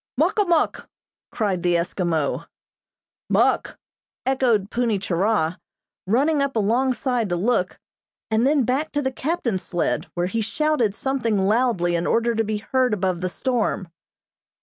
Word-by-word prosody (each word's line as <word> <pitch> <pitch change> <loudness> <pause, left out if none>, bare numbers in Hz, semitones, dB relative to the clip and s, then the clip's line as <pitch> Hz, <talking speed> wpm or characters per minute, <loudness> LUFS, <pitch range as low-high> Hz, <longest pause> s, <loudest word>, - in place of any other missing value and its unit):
"Muk - - +2
a 410 - +4
muk!" 340 -3 0 0.4
cried 200 -6 -1
the 175 0 +2
Eskimo. 170 -3 -1 0.8
"Muk!" - - +2 0.5
echoed 245 -7 +1
Punni 235 -3 +1
Churah, 185 -2 0 0.5
running 280 +8 +2
up 280 -2 -1
alongside 240 +1 +1
to 175 - 0
look, 190 0 0 0.5
and 220 +4 +3
then 285 -2 +3
back 265 +6 -1
to 290 0 0
the 265 - 0
captain's 260 - -2
sled, 175 - -1
where 175 0 0
he 225 +5 -1
shouted 245 -2 0
something 245 -6 -1
loudly 195 -3 +2
in 170 +1 -1
order 235 +1 +2
to 225 0 +1
be 215 0 -2
heard 250 +1 +1
above 185 -3 -1
the 185 - -1
storm. 225 -5 -1
225 Hz, 145 wpm, -23 LUFS, 185-260 Hz, 0.8 s, a